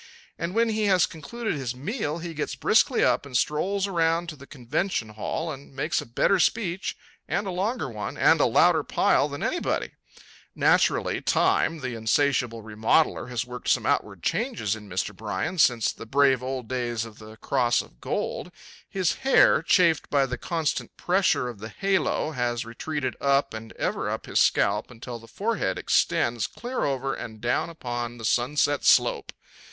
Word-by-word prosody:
And 170 +4 -4
when 230 0 +3
he 215 -1 0
has 185 -4 +4
concluded 220 +9 -5
his 130 -5 -4
meal 160 - -3
he 170 0 -6
gets 150 - -3
briskly - - +3
up - - +2
and 135 -3 -2
strolls 190 +9 0
around 170 -2 +1
to 155 - -7
the 140 -1 -14
convention 135 - -2
hall 135 +9 -4
and 140 -1 -11
makes 155 +5 0
a - - -10
better 160 +11 +2
speech 190 -1 0 0.3
and 205 - -1
a 190 - -3
longer 195 - -1
one 110 -4 -6
and - - +5
a - - +5
louder - - +4
pile - - +2
than - - -5
anybody. - - -1 0.6
Naturally, - - +2
time, 165 -2 +2
the 130 -2 -3
insatiable 115 0 +1
remodeler, 110 +6 +1
has 125 0 -3
worked 125 0 -8
some - - +2
outward - - -1
changes 105 -1 -1
in 105 -2 -11
Mr. 95 +2 -3
Bryan 105 - -3
since 120 -6 +4
the 115 - -11
brave 135 0 +3
old 130 -2 -4
days 120 -2 -2
of 110 -2 -13
the 110 0 -11
cross 120 -2 +1
of - - -21
gold. - - -3 0.4
His 185 -3 0
hair, 265 - +5
chafed 165 -1 +3
by 140 -2 +3
the 125 -1 -3
constant 160 +4 -3
pressure 185 -8 +2
of 120 -4 -7
the 110 +2 -7
halo, 190 - 0
has 120 -4 -2
retreated 130 +3 -4
up 140 -1 +2
and 110 0 -8
ever - - -2
up - - -4
his - - 0
scalp - - +2
until 120 0 -8
the 115 - -15
forehead 225 - -1
extends - - +1
clear 245 +2 -4
over 135 -1 -1
and 110 -2 -7
down 120 +8 0
upon 120 -6 -5
the 115 - -7
sunset 145 +5 +1
slope. - - +3
135 Hz, 175 wpm, -26 LUFS, 120-170 Hz, 0.6 s, and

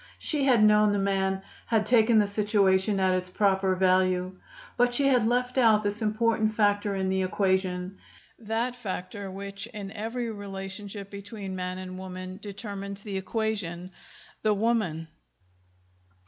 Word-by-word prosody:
She 295 -3 -1
had 245 -5 +5
known 210 0 +5
the - - +1
man, 195 -1 0 0.2
had 220 -2 +2
taken 225 0 +4
the 210 - +5
situation 200 -1 +2
at 190 -1 +3
its 185 0 -2
proper 190 -1 +2
value. 185 0 +2 0.4
But 245 0 +2
she 280 - +1
had 250 -5 +4
left 250 +2 +1
out 220 -3 +5
this 205 +2 -2
important 220 0 +1
factor 205 -1 +2
in 190 -1 -1
the 190 0 +1
equation, 185 -1 0 0.4
that 230 +3 -2
factor 200 -3 -5
which 200 +2 -5
in 210 -4 -7
every 230 +3 -3
relationship 200 0 -6
between 200 -1 -6
man 180 0 -3
and 185 0 -7
woman 185 0 -7
determines 200 -1 -6
the 200 -3 -4
equation, 190 -4 -3 0.5
the 215 -1 +2
woman. 205 -7 0
200 Hz, 145 wpm, -27 LUFS, 190-220 Hz, 0.5 s, had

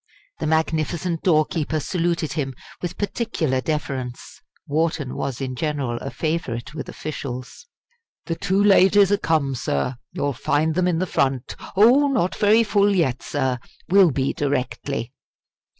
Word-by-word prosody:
The - - -2
magnificent 160 +2 0
doorkeeper 155 -2 +1
saluted 170 -1 -1
him 135 -4 -3 0.3
with 175 0 -4
particular 190 - -1
deference. 135 -5 -4 0.2
Wharton 155 -2 -1
was 135 -3 -3
in 130 -2 -3
general 140 -5 -2
a 135 - -5
favourite 155 -7 -3
with 150 - -6
officials. 135 - -6 0.6
"The 165 - -2
two 190 +4 +1
ladies 200 0 +6
are 205 - +4
come, 155 -6 +1
sir. 120 - -2
You'll 145 0 -1
find 155 +6 +1
them 180 +2 +1
in 175 -2 +1
the 185 - 0
front 135 -6 -1 0.2
oh! 245 +8 +6
not 245 -10 +1
very 215 +2 +4
full 205 -1 +3
yet, 135 -9 +1
sir 130 -3 -1 0.3
will 190 -1 +6
be 135 -1 0
directly." 135 -3 -2
155 Hz, 140 wpm, -23 LUFS, 135-180 Hz, 0.6 s, ladies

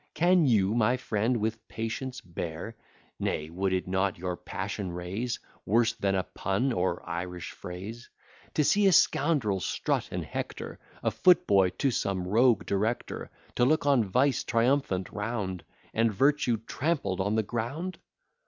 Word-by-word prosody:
Can 175 0 +4
you, 105 -4 +3
my 120 +2 +3
friend, 120 0 0
with 110 +1 -3
patience 120 +3 -4
bear 85 +4 -6 0.4
(Nay, 75 +1 -2
would 95 +2 -1
it 95 0 -1
not 95 0 0
your 90 0 -3
passion 95 +1 -4
raise 95 +8 -3 0.3
Worse 115 +2 +3
than 100 -3 0
a 95 - +1
pun, 100 - -1
or 90 -2 -1
Irish 90 +1 -4
phrase) 100 +6 -8 0.5
To 150 - +3
see 205 +7 +4
a 190 - +5
scoundrel 135 - +3
strut - - -1
and - - -3
hector, - - -5 0.2
A - - +2
foot 180 -1 +5
boy 95 -2 +4
to 135 - +2
some 95 -5 -1
rogue 110 +1 +4
director, 110 +5 -2 0.3
To - - +4
look 155 +5 +3
on 140 -5 +4
vice 125 +7 +2
triumphant 115 -6 +1
round, 105 -4 -3 0.3
And 115 0 +2
virtue 135 +1 +2
trampled 135 - -1
on 100 +3 0
the 110 - +2
ground? 125 - -4
110 Hz, 155 wpm, -28 LUFS, 95-125 Hz, 0.5 s, a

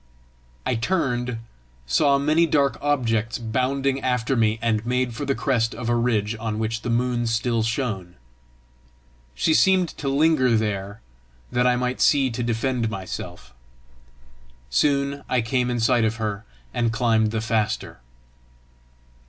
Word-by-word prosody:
I - - +1
turned, 125 -3 -1 0.5
saw 140 - +3
many 155 +4 +2
dark 140 -5 +2
objects 120 -6 0
bounding 130 +4 -1
after 125 +1 0
me, 110 -2 +2
and 115 -2 0
made 125 0 -1
for 145 +6 -4
the 135 -1 0
crest 115 -5 0
of 115 0 -4
a 120 - +2
ridge 115 -2 0
on 110 -1 -3
which 110 0 -2
the 120 - -4
moon 120 0 0
still 115 0 0
shone. 110 -6 -3 1.2
She 160 - +2
seemed 185 0 +4
to 140 - -2
linger 135 -4 +3
there 100 -1 -3 0.5
that 125 0 +2
I 125 - +3
might 125 +1 -2
see 135 -3 +4
to 115 - -4
defend 120 0 -1
myself. 90 - -7 1.2
Soon 140 - +1
I 125 - +2
came 125 +2 0
in 120 -1 -1
sight 120 +1 +3
of 110 0 +1
her, 105 -2 -4 0.3
and 115 -1 0
climbed 115 -2 +2
the 110 +1 -2
faster. 110 - -2
120 Hz, 145 wpm, -23 LUFS, 110-130 Hz, 1.2 s, seemed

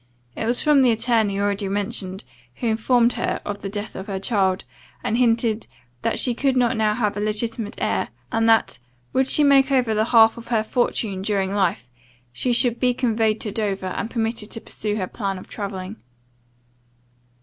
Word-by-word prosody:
It 225 - -3
was 240 +1 +2
from 295 -3 +5
the 255 - +5
attorney 225 -3 +1
already 200 0 0
mentioned, 200 -1 -3 0.3
who - - -5
informed 235 +2 +3
her - - -2
of 205 0 -5
the 195 - -4
death 205 +1 -6
of 190 - -7
her 195 -2 -3
child, 195 -3 +1 0.4
and 220 - 0
hinted, 230 -2 +2 0.3
"that - - -1
she 250 - +1
could 265 +2 +1
not 245 0 +2
now 215 -1 +1
have 210 -3 0
a - - -3
legitimate 215 +1 -2
heir, - - -1 0.2
and 225 0 +2
that, 225 - +3 0.3
would 265 0 +2
she 300 - +3
make 275 -1 +5
over 250 -4 +2
the 215 0 +1
half 225 -1 +5
of 230 - -12
her 230 -2 +1
fortune 220 -4 -1
during 195 -1 -1
life, 175 - 0 0.5
she 250 - -1
should 240 -1 +2
be 250 -1 +2
conveyed 225 -3 +1
to 210 - -2
Dover, 195 -3 -2
and 220 - -3
permitted 225 -2 -2
to 225 - -6
pursue 210 -1 -4
her 195 -3 -1
plan 195 0 -4
of 185 - -11
travelling." 195 0 -6
220 Hz, 185 wpm, -22 LUFS, 200-240 Hz, 0.5 s, from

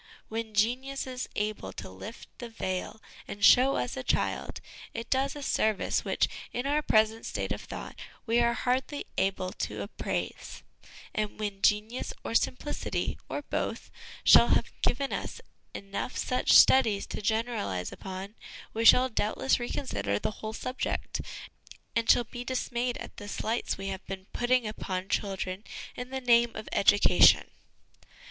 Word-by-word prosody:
When 220 -1 -4
genius 255 +6 0
is 255 -1 -5
able 210 - -2
to - - -7
lift 145 - -9
the 240 - -6
veil 190 -1 -4 0.2
and 200 0 0
show 260 +2 +7
us 250 - -2
a 265 - -3
child, - - -1 0.4
it 230 0 -6
does 270 +1 +1
a 290 - -6
service 215 -6 +1
which, - - +1 0.2
in 245 +2 -3
our 295 +2 +2
present 220 -4 +2
state - - -3
of - - -2
thought, - - -7 0.3
we 235 0 +2
are 235 0 +3
hardly 255 +4 -1
able 185 -1 0
to - - -4
appraise; - - -5 0.5
and 215 0 -2
when 205 -2 -4
genius 215 +5 +1
or - - -4
simplicity, 255 +5 -1
or 290 - -3
both, - - -3 0.3
shall - - +8
have - - +2
given 275 +2 0
us - - -4 0.4
enough 200 +5 -5
such 255 - +1
studies 220 -7 +6
to - - -6
generalise 210 - -1
upon, 190 +2 -7 0.4
we 225 - -1
shall 250 +2 +8
doubtless 230 +2 0
reconsider 240 - -2
the 105 - -2
whole 215 +1 -6
subject, 255 +3 -3 0.7
and 230 -1 0
shall 245 - +6
be 240 +1 -8
dis 255 0 -3
mayed 240 0 -1
at - - -9
the 205 - -8
slights 225 +3 -2
we 195 0 -4
have 190 0 -5
been 190 -1 -6
putting 245 0 +2
upon 190 -3 -4
child 195 -2 -1
ren 185 +2 -6 0.3
in 250 0 -6
the 265 0 -4
name 235 -1 +4
of 215 - -7
education. 205 +1 +5
225 Hz, 155 wpm, -29 LUFS, 205-250 Hz, 0.7 s, shall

